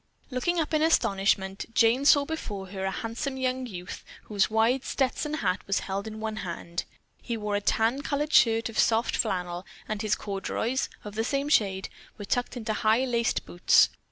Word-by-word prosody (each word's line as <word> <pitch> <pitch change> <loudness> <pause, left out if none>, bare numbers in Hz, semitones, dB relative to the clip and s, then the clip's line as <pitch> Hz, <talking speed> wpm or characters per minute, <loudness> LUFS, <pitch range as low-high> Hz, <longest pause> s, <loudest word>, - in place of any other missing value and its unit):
Looking 335 +8 0
up 320 -1 -1
in 310 - +3
astonishment, 195 -10 +1
Jane 240 +4 +4
saw 285 -1 +6
before 205 -12 -5
her 190 0 -4
a - - +1
handsome 235 +7 -4
youth 255 -8 -4 0.2
whose 205 -2 +1
wide 225 +4 +2
Stetson 285 +3 -1
hat 190 -11 0
was 195 - +1
held 200 +2 -4
in 220 0 -7
one 220 0 -3
hand. 170 -3 -4 0.4
He 235 -2 -3
wore 210 -1 -2
a 205 - 0
tan 225 +6 +1
colored 295 +2 -2
shirt 225 -1 +5
of 225 - -4
soft 225 +1 +3
flannel, 180 -4 -1 0.2
and 215 -1 -3
his 215 -2 +1
corduroys, 220 +5 -2
of 210 - -8
the 220 +1 -1
same 275 +4 -1
shade, 195 -8 +2 0.3
were 205 - -7
tucked 245 +4 -1
into 220 -2 -2
high, 220 +4 +2
laced 235 -2 0
boots. 175 - +4
225 Hz, 180 wpm, -27 LUFS, 200-260 Hz, 0.4 s, saw